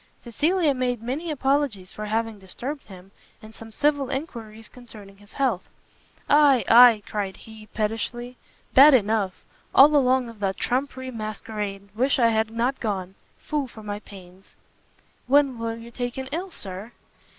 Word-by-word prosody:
Cecilia 305 - +1
made 250 -3 -2
many 280 +8 -3
apologies 270 -9 -1
for 215 - -6
having 220 0 -2
disturbed 250 +10 -7
him, 190 -1 -14 0.3
and 220 0 -13
some 225 0 -12
civil 285 +3 0
enquiries 225 -6 -6
concerning 215 -5 -14
his 205 +1 -18
health. 255 -10 -1 0.6
"Ay, 285 -4 +5
ay," 230 -2 +7
cried 200 -3 -4
he, 220 -1 -13
pettishly, 230 +3 -3 0.4
"bad 280 +2 +8
enough: 210 -4 0 0.3
all 295 +3 +8
along 260 -2 +3
of 230 -2 -12
that 195 -1 -1
trumpery 260 0 -2
masquerade; 210 -3 -6
wish 260 +6 +1
I 235 -3 +4
had 220 -1 +1
not 235 +4 -1
gone! 190 -4 -3 0.2
Fool 295 -3 -3
for 220 -3 -13
my 205 0 -5
pains." 190 -2 -15 0.7
"When 275 -2 +3
were 230 0 -3
you 230 +1 -11
taken 245 +2 -4
ill, 355 +5 -3
Sir?" 200 - -8
230 Hz, 150 wpm, -24 LUFS, 210-265 Hz, 0.7 s, bad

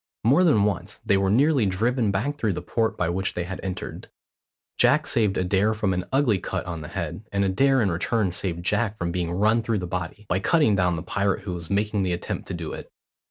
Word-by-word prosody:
More 140 - +5
than 115 - +4
once 100 -1 -2
they 100 - +3
were 95 0 +2
nearly 135 +1 +3
driven 115 +4 +1
back 130 +10 -1
through 110 -4 +1
the - - -4
port 115 -1 -1
by 90 - 0
which 95 +2 -2
they 90 - -1
had 95 +2 -6
entered. 95 -1 -6 0.7
Jack - - +4
saved 105 -4 +1
Adair 95 +4 +1
from 105 -3 0
an 90 0 -2
ugly 130 -7 +2
cut - - -4
on 85 -3 -5
the 75 - -7
head, 95 +4 -5
and 100 0 +1
Adair 135 +6 +3
in 100 - +1
return 95 +3 0
saved 85 -1 -4
Jack 105 +2 0
from 85 -3 -2
being 85 -1 -2
run 105 +5 +2
through 115 -1 -1
the 90 - -3
body, 90 +3 -5
by 95 - +1
cutting 115 - +3
down 90 -2 +2
the 80 - -5
pirate 100 +1 -1
who 95 - -4
was 85 -2 -6
making 105 +1 0
the 90 -2 0
attempt 85 - -4
to - - -4
do 85 -2 -5
it. - - -9
100 Hz, 230 wpm, -24 LUFS, 90-110 Hz, 0.7 s, More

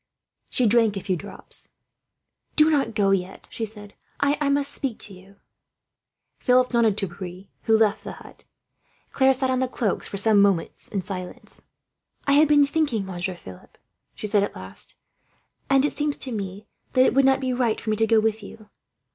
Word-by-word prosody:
She 250 - +1
drank 220 -2 +3
a - - -4
few 185 - -1
drops. 200 +4 -7 0.9
"Do 310 +1 +5
not 275 -7 +1
go 200 -2 +3
yet," 190 -1 -2
she 225 - -3
said. 205 -1 -12 0.3
"I 285 0 +1
must 280 0 0
speak 260 -6 -3
to 200 - -10
you." 190 +2 -16 1.0
Philip 250 0 +3
nodded 225 -4 +3
to 195 - -1
Pierre, 180 +1 -8 0.2
who 220 0 +5
left 220 -1 +2
the - - -6
hut. - - -14 0.7
Claire 265 0 +4
sat 260 0 0
on 255 - +1
the 260 - +1
cloaks 225 -5 -2
for 200 - -5
some 205 0 +4
minutes, 195 -4 +1
in 195 - -3
silence. 185 -1 -6 0.6
"I 280 - +2
have 300 +2 +6
been 290 -1 +5
thinking, 280 -8 0
Monsieur 185 0 -4
Philip," 95 - -13 0.4
she - - -6
said 205 -1 +2
at 200 - -2
last, 95 0 -4 0.7
"and 275 0 +4
it - - 0
seems 295 -1 -1
to 260 - -6
me 200 -1 -5 0.3
that 255 -1 +5
it - - +3
would 275 +1 +4
not 270 0 +4
be 260 -1 -1
right 240 -3 0
for 220 - -3
me - - +2
to 225 +1 +2
go 225 0 +5
with 220 0 0
you. 210 +1 -12
220 Hz, 190 wpm, -24 LUFS, 195-265 Hz, 1.0 s, have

